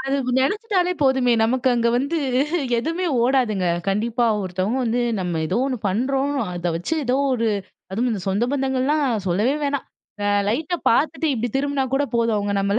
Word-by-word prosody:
அது 270 0 -1 0.2
நெனச்சுட்டாலே 365 - +1
போதுமே, 265 -2 +3
நமக்கு 255 +3 +1
அங்க 235 -1 +2
வந்து 280 +6 -1 0.6
எதுவுமே 330 +7 -2 0.2
ஓடாதுங்க. 240 -7 +1 0.2
கண்டிப்பா, 230 +5 0 0.2
ஒருத்தவங்க 190 +7 -1
வந்து 235 +1 0 0.2
நம்ம 175 -3 -2
ஏதோ 155 - -1
ஒண்ணு 255 -3 -2
பண்றோம். 265 +7 0 0.2
அத 175 0 -2
வச்சு 175 - -2
ஏதோ 250 +1 +1 0.2
ஒரு 230 -2 +1 0.4
அதுவும் 240 +5 0
இந்த 205 - -3
சொந்த 200 +5 +1
பந்தங்கள்லாம் 270 +2 +1 0.2
சொல்லவே 210 +10 +1
வேணா. 280 -1 0 0.7
லைட்டா 310 +10 -1
பார்த்துட்டு 310 +6 +1
இப்படி 240 +1 -2
திரும்பினா 280 -1 0
கூட 275 - +2
போதும். 230 -2 +2
அவங்க 205 0 -1
நம்மள 200 +2 +1
250 Hz, 155 wpm, -22 LUFS, 215-280 Hz, 0.7 s, போதுமே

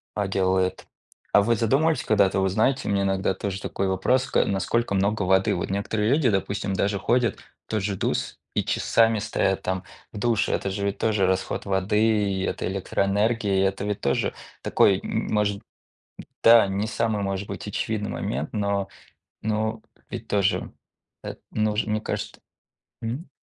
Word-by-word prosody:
а, 105 -2 0
делает. 95 -1 0 0.5
А 100 - +7
вы 115 +3 +2
задумывались 135 +9 +2
когда-то? 100 -3 +3
Вы 95 0 +2
знаете, 110 +8 +1
у - - 0
меня 100 -1 +1
иногда 95 -1 +1
тоже 95 0 -4
такой 95 - -2
вопрос: 95 +8 +2
ка - - +3
насколько 100 +2 0
много 100 +2 +1
воды? 95 +1 +3
Вот 85 - -3
некоторые 105 +2 -1
люди, 140 -1 +3
допустим, 100 0 -1
даже 100 +1 0
ходят 120 0 +1 0.3
в - - -59
тот 110 -2 -1
же 100 0 -1
в - - -9
душ - - -1 0.2
и - - +2
часами 115 -1 +2
стоят 100 -2 0
там 95 0 -2 0.3
в - - -7
душе. 110 -1 +1
Это 100 - -1
же 100 +1 -3
ведь 100 0 -1
тоже 105 -4 +1
расход 95 0 -1
воды, 100 +2 +1 0.3
и 95 - -2
это - - -2
электроэнергии, 100 +2 +1
это 95 0 -1
ведь 105 -1 -2
тоже - - 0 0.3
такой, - - +3
м - - -2
может, 105 -1 +1 0.8
да, 115 -3 +8
не 100 +2 -1
самый, 110 -1 -1
может 100 0 -2
быть, 100 +1 -6
очевидный 105 +1 -2
момент, 70 +5 -3
но 100 -2 0 0.6
но 110 +1 -1 0.3
ведь 115 -2 -7
тоже 100 -1 +1 0.5
эт - - -7
нужно, 110 0 0
мне 110 - 0
кажется. - - -5 0.6
Мгм. 125 +8 -4
100 Hz, 170 wpm, -25 LUFS, 95-110 Hz, 0.8 s, да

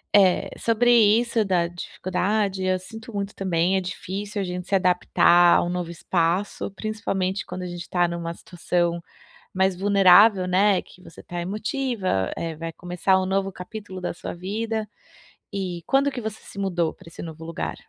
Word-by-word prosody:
eh, 190 -3 +4
sobre 235 +1 +3
isso 230 0 +4
da 175 -3 +1
dificuldade, 190 +3 -2
eu 185 0 +1
sinto 225 +4 -10
muito 200 0 -4
também. 185 0 +1
É 190 - 0
difícil 200 +3 -5
a 195 - -2
gente 180 0 -5
se - - -6
adaptar 175 -1 +5
a - - +2
um 175 - -2
novo 175 -1 -3
espaço, 175 +4 -1
principalmente 195 -2 -2
quando 185 - -6
a 180 - -4
gente 175 0 -6
está 175 0 +1
numa 170 -1 -4
situação 175 0 -1 0.6
mais 190 0 +2
vulnerável, 195 0 +6
né, 195 +1 +3
que 180 - -18
você 165 - -13
está 175 0 -5
emotiva, 205 - -1
eh, 165 -2 -4
vai 165 +1 -5
começar 180 +2 +1
um - - -1
novo 195 0 0
capítulo 185 0 -8
da - - -2
sua - - -6
vida 220 +4 -3 0.7
e 185 -3 -3
quando 275 +1 +3
que 245 - -5
você 220 0 -5
se 200 - -10
mudou 175 -4 0
para - - -18
esse - - -10
novo 160 -1 -8
lugar? 165 - -4
185 Hz, 175 wpm, -24 LUFS, 175-205 Hz, 0.7 s, vulnerável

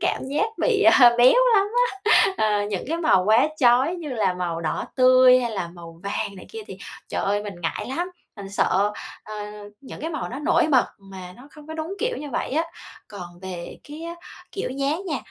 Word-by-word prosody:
cảm - - -1
giác 300 +11 0
bị, 435 -4 +2
à, 260 -9 +7
béo 245 +2 +7 0.2
lắm 400 0 +4 0.5
á. - - +5
Ờ, 210 -1 +1
những 195 -4 -3
cái 330 +2 -1
màu 310 - +3
quá 225 +7 +4
chói 260 +5 +3
như 330 -5 -7
là 215 -7 0
màu 175 -2 -3
đỏ 155 - -2
tươi, 255 0 +6
hay 240 -2 -2
là 190 -5 -3
màu 170 -1 -13
vàng 200 0 -3
này 185 - -11
kia 450 - -8
thì - - -9 0.3
trời - - -3
ơi, 205 +1 0
mình 205 -2 -6
ngại 165 - -3
lắm, 355 +2 -3 0.2
mình 200 -2 -9
sợ, 200 +1 +1 0.3
ờ, 215 - -9 0.5
những 265 - -10
cái 320 - -3
màu 310 - -4
nó 255 - -6
nổi 300 +1 +2
bật 255 -3 +5
mà 190 -2 -11
nó 260 +4 -15
không 300 -1 -15
có 315 - -7
đúng 320 +4 -5
kiểu 485 +1 -1
như 295 - -7
vậy - - -3
á. 315 +4 +1 0.4
Còn 175 -4 -10
về 180 -2 -7
cái 300 +3 -10
á 340 +1 -6 0.4
kiểu 395 - -4
dáng 280 +8 -2
nha, 300 -6 -2
255 Hz, 215 wpm, -23 LUFS, 195-315 Hz, 0.5 s, à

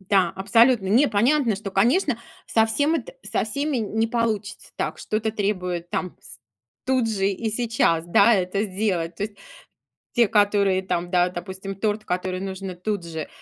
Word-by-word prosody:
Да, 190 -2 +2
абсолютно. 225 +2 +4
Не, 250 +8 +4
понятно, 235 +1 +2
что, 200 0 -6
конечно, 240 - +2 0.3
совсем 225 +8 +2
это 330 - -4
со - - -1
всеми 280 +5 -1
не 220 0 0
получится 225 -3 -2
так, - - -3
что-то 220 +1 -2
требует 180 -5 -2
там 190 -4 -3
с - - -12 0.5
тут 255 -3 +1
же 195 -3 0
и 210 +3 -2
сейчас, 220 -8 +1
да, 200 +6 +5
это 190 +1 0
сделать. 185 -5 -2
То 205 - -2
есть 210 -1 -8 0.8
те, 235 -3 +4
которые 200 -2 +3
там, 180 -2 -3
да, 180 -1 +3
допустим, 190 +2 -6
торт, 210 +2 -2
который 185 +1 -2
нужно 190 0 -5
тут 200 +1 -3
же 160 -2 -5
205 Hz, 160 wpm, -23 LUFS, 185-225 Hz, 0.8 s, да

